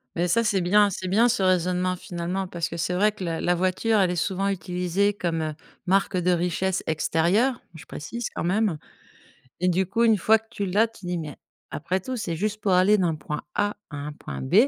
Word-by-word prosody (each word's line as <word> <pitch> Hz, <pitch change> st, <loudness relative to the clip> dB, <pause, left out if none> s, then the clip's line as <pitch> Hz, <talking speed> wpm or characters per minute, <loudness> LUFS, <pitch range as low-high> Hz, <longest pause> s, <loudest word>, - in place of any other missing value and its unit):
Mais, 175 Hz, +1 st, +1 dB
ça 230 Hz, +6 st, +2 dB
c'est 205 Hz, -4 st, +1 dB
bien. 205 Hz, +3 st, +4 dB
C'est 185 Hz, 0 st, -5 dB
bien 220 Hz, +6 st, +4 dB
ce 235 Hz, -4 st, +1 dB
raisonnement 185 Hz, 0 st, +1 dB
finalement, 180 Hz, +2 st, -4 dB
parce 170 Hz, -2 st, -3 dB
que 170 Hz, -, -6 dB
c'est 170 Hz, +2 st, -1 dB
vrai 210 Hz, +4 st, +3 dB
que 205 Hz, -3 st, -8 dB
la 165 Hz, -2 st, -2 dB
la 175 Hz, 0 st, +2 dB
voiture 185 Hz, +5 st, +1 dB
elle 185 Hz, -2 st, +3 dB
est -, -, -2 dB
souvent 195 Hz, +3 st, -1 dB
utilisée 185 Hz, +1 st, 0 dB
comme, 170 Hz, -4 st, -2 dB
heu, 155 Hz, -1 st, -2 dB, 0.3 s
marque 195 Hz, 0 st, +2 dB
de 180 Hz, 0 st, +1 dB
richesse 180 Hz, +2 st, 0 dB
extérieure- 175 Hz, -, +1 dB
je 160 Hz, -1 st, -12 dB
précise 235 Hz, +10 st, -5 dB
quand -, -, -3 dB
même- 195 Hz, -2 st, +1 dB, 0.8 s
et 180 Hz, -, +2 dB
du 185 Hz, +2 st, +2 dB
coup, 230 Hz, +5 st, +1 dB
une 225 Hz, -2 st, +5 dB
fois 220 Hz, +4 st, +4 dB
que 225 Hz, -, -24 dB
tu 200 Hz, -4 st, -3 dB
l'as, 205 Hz, +5 st, +3 dB
tu 220 Hz, -5 st, -13 dB
dis: 175 Hz, -1 st, -2 dB
«Mais 150 Hz, -3 st, -6 dB, 0.3 s
après 175 Hz, +5 st, -2 dB
tout, 255 Hz, +5 st, -5 dB
c'est 170 Hz, -7 st, -3 dB
juste 210 Hz, +3 st, -2 dB
pour 195 Hz, -, +1 dB
aller 190 Hz, +3 st, +5 dB
d'un 170 Hz, -4 st, +1 dB
point 150 Hz, +1 st, -5 dB
A 205 Hz, 0 st, 0 dB, 0.2 s
à 145 Hz, -, -7 dB
un 145 Hz, +1 st, -5 dB
point -, -, -7 dB
B». 200 Hz, -, +5 dB
185 Hz, 225 wpm, -25 LUFS, 170-205 Hz, 0.8 s, une